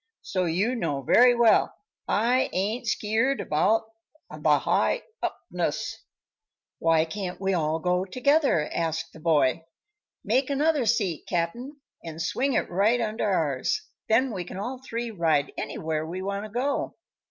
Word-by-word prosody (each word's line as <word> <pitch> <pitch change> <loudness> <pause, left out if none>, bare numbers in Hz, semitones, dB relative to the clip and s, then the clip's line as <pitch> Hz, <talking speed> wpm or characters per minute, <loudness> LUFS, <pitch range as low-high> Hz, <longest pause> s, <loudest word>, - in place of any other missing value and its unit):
So 185 -1 -1
you 190 +9 +1
know 145 - -2
very 245 - +6
well 235 -2 +4 0.3
I 245 +4 +2
ain't 215 +6 -1
skeert 225 +6 +1
about 210 +10 +2 0.5
the - - -8 0.2
highupness." 485 -2 -2 0.8
"Why 165 -1 +3
can't 180 +2 -5
we 195 0 0
all 160 -2 0
go 180 +2 0
together?" 255 - +2
asked 165 -1 -2
the - - -12
boy. 155 -2 +2 0.6
"Make 255 +5 +1
another 285 -2 +1
seat, 190 -7 0
Cap'n, 235 - -3 0.2
and 160 -1 -7
swing 260 +11 0
it - - +1
right 205 +7 +2
under 220 -1 -1
ours; 155 - 0 0.3
then 235 +2 +3
we 185 -3 -3
can 175 - -9
all 250 +6 -5
three 235 -2 -4
ride 160 -7 +1
anywhere 155 -1 -3
we 175 +4 -5
want 200 +1 -3
to - - -8
go." 255 +6 -2
200 Hz, 140 wpm, -26 LUFS, 165-245 Hz, 0.8 s, very